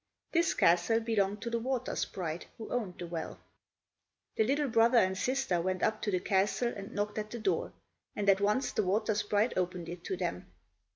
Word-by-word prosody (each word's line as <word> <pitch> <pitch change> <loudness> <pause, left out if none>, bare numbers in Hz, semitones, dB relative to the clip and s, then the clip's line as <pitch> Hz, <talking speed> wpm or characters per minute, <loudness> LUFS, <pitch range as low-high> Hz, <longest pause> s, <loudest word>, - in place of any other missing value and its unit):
This 335 -1 +2
castle 175 +7 +4
belonged 210 -3 0
to 235 - -3
the 235 - 0
water 255 +1 -2
sprite 170 -3 -3
who 220 - -8
owned 215 -8 -2
the 175 - -5
well. 165 -1 -5 1.0
The 220 - +3
little 280 +5 +1
brother 230 0 +4
and 190 -4 +4
sister 245 -4 0
went 185 +1 -1
up 215 0 +1
to - - -1
the 185 -2 +1
castle 200 +6 +1
and 200 0 -7
knocked 210 +1 -1
at 215 0 -4
the 235 - -5
door, 220 - 0 0.4
and 205 - -2
at 195 0 +5
once 210 +7 +1
the - - +1
water 210 +3 +1
sprite 210 +2 +1
opened 180 -2 -2
it 175 0 -7
to 190 - -2
them. 170 - -4
205 Hz, 195 wpm, -31 LUFS, 185-230 Hz, 1.0 s, at